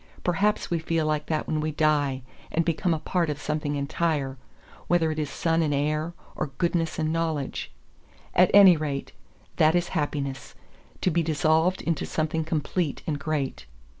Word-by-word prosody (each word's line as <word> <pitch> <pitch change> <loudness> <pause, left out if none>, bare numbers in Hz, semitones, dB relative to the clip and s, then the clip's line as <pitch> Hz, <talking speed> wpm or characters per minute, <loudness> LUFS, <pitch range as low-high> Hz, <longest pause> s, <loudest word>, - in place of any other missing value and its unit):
Perhaps 200 +4 +1
we 170 - +1
feel 165 0 0
like 150 -1 -1
that 155 -1 -1
when 155 - -1
we 155 0 -1
die 145 -4 +1 0.3
and 165 0 +1
become 170 +1 0
a 160 - +2
part 170 +1 -1
of 145 -1 -3
something 150 0 -2
entire, 140 -1 -1 0.5
whether 165 -2 +2
it 155 - -3
is 150 -2 -2
sun 165 0 +1
and 150 -3 +1
air, 155 +4 -1 0.2
or - - -2
goodness 170 -2 0
and 155 0 0
knowledge. 160 -4 -2 0.6
At 180 0 +5
any 195 -3 +9
rate, 145 -3 -3 0.5
that 155 +2 +4
is 175 0 +1
happiness; 145 -4 -3 0.5
to 185 - +2
be 170 - +2
dissolved 160 +3 +2
into 165 -3 -1
something 160 0 -1
complete 155 0 -2
and 150 -3 -2
great. 140 - -3
155 Hz, 165 wpm, -26 LUFS, 150-165 Hz, 0.6 s, any